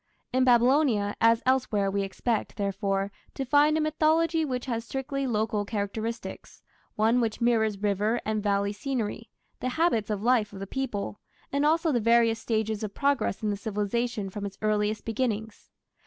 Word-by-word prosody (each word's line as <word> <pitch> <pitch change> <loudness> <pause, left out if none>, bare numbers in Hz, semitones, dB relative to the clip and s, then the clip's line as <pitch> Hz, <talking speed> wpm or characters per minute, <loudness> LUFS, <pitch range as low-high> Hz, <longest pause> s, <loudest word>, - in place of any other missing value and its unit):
In 255 0 +3
Babylonia, 245 -4 +3
as 230 0 +4
elsewhere, 235 -7 +1
we 200 0 0
expect, 210 +3 -2
therefore, 195 0 -1 0.2
to 270 - -3
find 295 +3 +4
a - - +1
mythology 315 +1 +2
which 255 -4 -3
has 230 -3 -2
strictly 270 +2 -3
local 215 -2 0
characteristics 220 +2 -5 0.3
one 225 +3 +3
which 225 -2 -1
mirrors 225 -3 +2
river 210 +3 0
and 215 0 -1
valley 200 0 0
scenery, 230 -2 -3 0.3
the 255 - -2
habits 250 -8 +1
of 210 -1 -2
life 230 -4 +2
of 195 - -8
the 195 - -4
people, 210 -4 -4 0.3
and 280 +1 +2
also 325 +1 +2
the 245 - +2
various 230 0 +3
stages 220 -1 -1
of 205 -2 -5
progress 280 -7 0
in 210 - +1
the - - -1
civilization 210 0 -2
from 205 +1 -6
its 200 -1 -6
earliest 215 0 0
beginnings. 220 -2 -3
225 Hz, 165 wpm, -27 LUFS, 205-255 Hz, 0.3 s, as